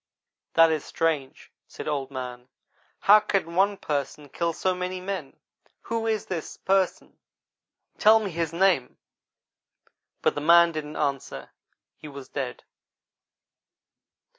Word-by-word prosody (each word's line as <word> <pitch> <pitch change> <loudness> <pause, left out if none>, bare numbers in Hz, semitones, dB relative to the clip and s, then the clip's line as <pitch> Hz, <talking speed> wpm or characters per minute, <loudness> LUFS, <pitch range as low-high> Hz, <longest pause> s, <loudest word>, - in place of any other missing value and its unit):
"'That 165 0 +6
is 155 -2 -1
strange,' 155 -5 -2 0.2
said - - -9
Old 140 -3 -2
man; 125 -2 -7 0.5
'how 210 +2 +7
can 195 -5 -1
one 195 +3 +2
Person 145 -1 -4
kill 170 +4 -1
so 185 +3 0
many 180 0 -4
men? 195 +1 -5 0.4
Who 230 0 -3
is 220 -2 -1
this 170 -4 -5
Person, 190 -1 0 0.8
tell 220 +1 +7
me 205 -3 -4
his 165 -1 -2
name!' 170 -7 +1 1.3
but - - +3
the 145 - -4
man 170 +2 +6
didn't 155 -1 -6
answer 140 -2 -3 0.5
he - - -11
was 140 -2 -10
dead. 130 -4 -5
165 Hz, 125 wpm, -26 LUFS, 145-190 Hz, 1.3 s, how